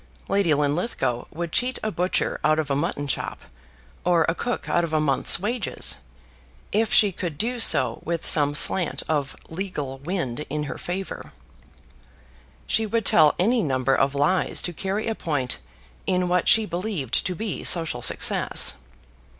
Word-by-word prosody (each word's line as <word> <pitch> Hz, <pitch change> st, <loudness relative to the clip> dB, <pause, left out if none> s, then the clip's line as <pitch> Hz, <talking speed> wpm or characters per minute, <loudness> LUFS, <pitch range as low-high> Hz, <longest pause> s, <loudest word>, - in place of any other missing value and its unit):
Lady 195 Hz, -4 st, +1 dB
Linlithgow 145 Hz, -, -1 dB
would 170 Hz, +1 st, -5 dB
cheat 250 Hz, +5 st, 0 dB
a 215 Hz, -, -1 dB
butcher 180 Hz, -1 st, -1 dB
out 155 Hz, 0 st, +3 dB
of 150 Hz, -3 st, -2 dB
a -, -, +2 dB
mutton 145 Hz, -1 st, -2 dB
chop, 140 Hz, -, -3 dB, 0.6 s
or 175 Hz, -2 st, +3 dB
a 165 Hz, -, +1 dB
cook 245 Hz, +7 st, -4 dB
out 175 Hz, -, +1 dB
of 165 Hz, -2 st, -4 dB
a 155 Hz, -, +3 dB
month's 145 Hz, +1 st, +3 dB
wages, 215 Hz, +3 st, -1 dB, 0.7 s
if 220 Hz, +2 st, +1 dB
she 205 Hz, -2 st, +6 dB
could 170 Hz, -4 st, -5 dB
do 240 Hz, +7 st, -1 dB
so -, -, +3 dB
with 170 Hz, 0 st, -3 dB
some 145 Hz, -2 st, +4 dB
slant 175 Hz, +3 st, +2 dB
of 145 Hz, -3 st, -1 dB
legal 160 Hz, -7 st, -5 dB
wind 145 Hz, -5 st, -3 dB
in 150 Hz, +1 st, -2 dB
her 145 Hz, -, -6 dB
favour. 185 Hz, +2 st, -6 dB, 1.3 s
She 220 Hz, 0 st, +1 dB
would 225 Hz, 0 st, -1 dB
tell 150 Hz, -5 st, +5 dB
any 230 Hz, +6 st, +2 dB
number 135 Hz, -4 st, 0 dB
of 135 Hz, +1 st, +1 dB
lies 145 Hz, +6 st, +2 dB
to 175 Hz, -, -2 dB
carry 195 Hz, +5 st, -3 dB
a 225 Hz, -, -1 dB
point 145 Hz, -10 st, -3 dB, 0.5 s
in 180 Hz, 0 st, +1 dB
what 180 Hz, 0 st, +1 dB
she 220 Hz, -1 st, +6 dB
believed 175 Hz, -, -2 dB
to 180 Hz, -, -3 dB
be 215 Hz, +1 st, -4 dB
social 165 Hz, -8 st, +2 dB
success. 115 Hz, -, +2 dB
170 Hz, 160 wpm, -24 LUFS, 145-195 Hz, 1.3 s, she